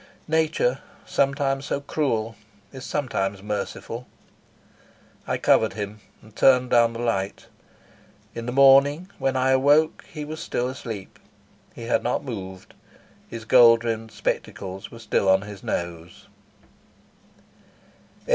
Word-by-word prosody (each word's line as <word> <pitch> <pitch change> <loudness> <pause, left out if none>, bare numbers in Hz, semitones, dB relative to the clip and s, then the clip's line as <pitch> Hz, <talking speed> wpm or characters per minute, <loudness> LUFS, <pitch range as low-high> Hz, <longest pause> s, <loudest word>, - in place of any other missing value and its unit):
Nature, 155 -5 +1 0.3
sometimes 135 0 0
so - - -1
cruel, 115 -7 -2 0.4
is 130 -2 -9
sometimes 100 -9 -2
merciful. 105 +3 -5 1.2
I - - 0
covered 110 - +3
him 105 0 -6 0.2
and 110 0 -18
turned 125 0 +4
down 115 -1 +4
the 115 - -7
light. 100 -5 -2 0.9
In 115 0 -6
the - - -1
morning 140 +7 +5
when 135 -1 0
I 130 0 +2
awoke 145 +4 +3
he 150 -2 -6
was 155 +1 -7
still 125 - -2
asleep. 115 -6 -7 0.6
He 115 - -8
had 115 - +1
not 120 - -2
moved. 95 -7 -7 0.6
His 115 -1 -8
gold 115 -1 +6
rimmed 115 -1 -3
spectacles 95 0 -4
were 115 - -12
still 105 -3 0
on 95 +1 +4
his 105 -2 -10
nose. 85 0 -5
120 Hz, 125 wpm, -24 LUFS, 105-135 Hz, 1.2 s, gold